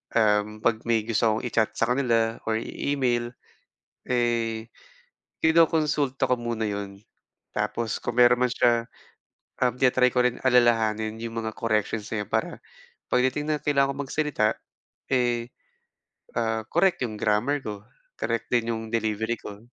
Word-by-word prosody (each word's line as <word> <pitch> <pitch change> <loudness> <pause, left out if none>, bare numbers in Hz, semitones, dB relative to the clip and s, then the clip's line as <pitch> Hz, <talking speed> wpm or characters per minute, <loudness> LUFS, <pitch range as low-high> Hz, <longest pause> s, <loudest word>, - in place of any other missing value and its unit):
um, 105 -1 +2
'pag 115 -2 +2
may 115 -1 +3
gusto 115 0 +1
akong 110 +1 -1
i-chat 110 -2 +1
sa 115 +1 +1
kanila 115 -3 +1
or 110 - +1
i - - -7 0.3
email, 120 -3 0 0.8
eh, 115 -2 0 0.7
kinokonsulta 150 -4 +3
ko 125 - +4
muna 115 -2 -2
'yon, 100 -1 -5 0.6
tapos 115 -1 -2
kung 120 0 -4
meron 120 0 +6
man - - -6
siya 120 -1 +2 0.8
um, 125 -1 +2
tina-try 125 -1 +3
ko 125 - +3
rin 125 -1 +1
alalahanin 110 -3 +3
'yong 115 0 -5
mga 110 - -3
corrections 110 -2 -1
na 105 -2 -1
'yun - - -22
para - - -1 0.5
pagdating 130 +4 +1
na 150 - -1
kailangan 140 -2 +2
kong 140 - -3
magsalita, 150 -6 0 0.6
eh, 120 -2 +1 0.9
ah, 110 -1 0
korek 180 +2 +2
'yung 110 -3 -4
grammar 110 +8 +1
ko, 105 -2 -6 0.4
korek 115 -1 -2
din 115 -1 +2
'yung 110 - -4
delivery 110 0 -1
ko. 100 -1 -9
115 Hz, 145 wpm, -26 LUFS, 110-125 Hz, 0.9 s, meron